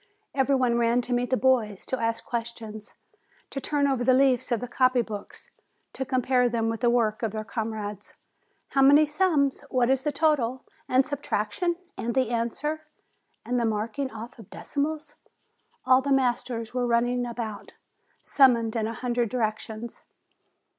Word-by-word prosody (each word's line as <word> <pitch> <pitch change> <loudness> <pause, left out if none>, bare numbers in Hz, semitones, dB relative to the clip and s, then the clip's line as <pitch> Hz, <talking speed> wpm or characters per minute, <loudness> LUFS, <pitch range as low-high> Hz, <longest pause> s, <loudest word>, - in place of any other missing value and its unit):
Every 275 0 +2
one 245 -2 +2
ran 235 +1 +3
to 245 0 -3
meet 245 0 0
the 255 - +2
boys, 235 -7 +1
to 260 - -2
ask 230 0 -1
questions, 225 -3 -6 0.6
to 275 - -4
turn 285 +1 +1
over 265 -3 0
the 255 +1 +4
leaves 260 -2 +2
of 235 - +2
the 245 - -5
copy 255 0 +2
books 210 -3 -9 0.4
to 265 - -3
compare 255 -1 +2
them 225 -1 0
with 225 0 -3
the 240 - +4
work 230 -1 +1
of 220 -3 -2
their 215 -1 -3
comrades. 215 -3 -5 0.5
"How 275 - +2
many 285 +3 +7
sums? 300 -4 +1
What 250 0 +2
is 265 -1 +2
the 295 +2 -1
total? 270 -5 +1 0.2
And 260 +1 +4
sub 285 -1 -5
traction? 220 - -1 0.2
And 235 0 -2
the 255 -3 +1
answer? 295 +7 -2 0.6
And 245 0 0
the 235 - +1
marking 225 +5 -2
off 230 +2 -9
of 215 - -13
decimals 300 +1 -3 0.4
?" - - -42
All 255 0 +5
the 280 +1 -2
masters 245 -3 0
were 250 -1 0
running 245 +1 +1
about, 230 -3 -6 0.5
summoned 235 -5 +4
in 220 -1 0
a 230 - -5
hundred 240 -1 -1
directions. 220 -1 -3
245 Hz, 170 wpm, -26 LUFS, 230-265 Hz, 0.6 s, many